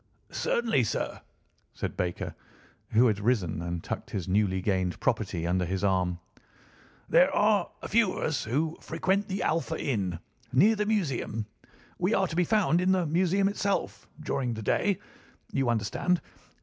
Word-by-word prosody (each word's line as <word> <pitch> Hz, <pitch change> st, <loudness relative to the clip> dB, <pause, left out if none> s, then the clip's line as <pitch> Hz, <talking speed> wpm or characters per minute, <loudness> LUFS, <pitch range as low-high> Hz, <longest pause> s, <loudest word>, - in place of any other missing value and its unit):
"Certainly, 225 Hz, -, +1 dB
sir," -, -, -3 dB, 0.5 s
said -, -, -4 dB
Baker, 90 Hz, -1 st, -2 dB, 0.6 s
who 115 Hz, +3 st, +5 dB
had 105 Hz, -4 st, +2 dB
risen 100 Hz, -7 st, 0 dB
and 85 Hz, -1 st, -4 dB
tucked -, -, -5 dB
his 95 Hz, -3 st, -4 dB
newly 95 Hz, 0 st, +2 dB
gained 95 Hz, -2 st, 0 dB
property 85 Hz, -1 st, -1 dB
under 90 Hz, +1 st, +1 dB
his 95 Hz, +3 st, -2 dB
arm. 90 Hz, -3 st, +1 dB, 0.9 s
"There -, -, +5 dB
are 205 Hz, -3 st, +3 dB
a -, -, -3 dB
few 220 Hz, -4 st, +3 dB
of -, -, -4 dB
us 145 Hz, -4 st, 0 dB
who 155 Hz, +8 st, -1 dB
frequent 195 Hz, +2 st, 0 dB
the 195 Hz, -1 st, -2 dB
Alpha 160 Hz, 0 st, 0 dB
Inn, 95 Hz, -10 st, -1 dB, 0.3 s
near 195 Hz, +13 st, +5 dB
the 210 Hz, 0 st, -1 dB
Museum—we 150 Hz, -, -2 dB
are 190 Hz, -1 st, +2 dB
to 165 Hz, -, -6 dB
be 175 Hz, 0 st, +3 dB
found 185 Hz, -4 st, +3 dB
in 185 Hz, +1 st, +3 dB
the 185 Hz, -2 st, +1 dB
Museum 185 Hz, +5 st, +2 dB
itself 200 Hz, 0 st, -2 dB
during 135 Hz, -6 st, -2 dB
the 110 Hz, -, -6 dB
day, 200 Hz, -, +1 dB, 0.5 s
you 135 Hz, -3 st, +1 dB
understand. 120 Hz, -, +1 dB
135 Hz, 155 wpm, -28 LUFS, -, 0.9 s, who